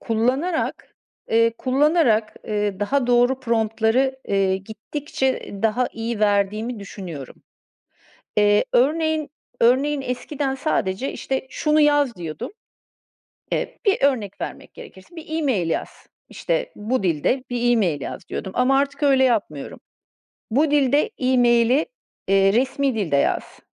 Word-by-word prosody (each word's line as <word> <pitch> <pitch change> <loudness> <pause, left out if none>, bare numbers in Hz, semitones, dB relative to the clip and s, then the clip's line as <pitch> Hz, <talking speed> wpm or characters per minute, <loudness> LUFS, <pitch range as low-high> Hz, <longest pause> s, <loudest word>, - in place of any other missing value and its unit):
kullanarak, 255 +10 -1 0.4
eee, 230 0 +4
kullanarak, 260 -5 +2
eee, 205 -2 -2
daha 250 +5 +1
doğru 245 +2 +3
prompt'ları 230 +2 +1
eee, 195 -1 +2
gittikçe, 225 +8 -4
eee, 200 0 -9
daha 235 +3 +1
iyi 225 -1 -4
verdiğimi 210 +3 +1
düşünüyorum. 175 - -8 1.0
Eee, 205 0 +4
örneğin, 310 +3 +1 0.3
örneğin 275 +5 +3
eskiden 265 +2 -3
sadece 260 -4 -1
işte 265 0 -3
şunu 305 0 +1
yaz 290 -6 +3
diyordum. 160 -3 -6 1.0
Eee, - - -2
bir 400 - +3
örnek 230 -8 0
vermek - - -7
gerekirse, 255 - -13
bir 325 - -9
e-mail 210 - 0
yaz. - - -4 0.2
İşte - - -2
bu 220 +2 -1
dilde 180 - 0
bir 240 0 +1
e-mail 180 -11 +1
yaz - - -7
diyordum 190 - -5
ama 265 +2 +3
artık 280 +1 -2
öyle 270 -2 +4
yapmıyorum. 200 - -1 0.7
Bu 285 +7 +2
dilde 290 - +3
e-maili, 245 +1 +3 0.4
eee, 195 0 +4
resmî 265 +3 +1
dilde 185 -10 0
yaz, 140 - -1
245 Hz, 125 wpm, -22 LUFS, 205-275 Hz, 1.0 s, eee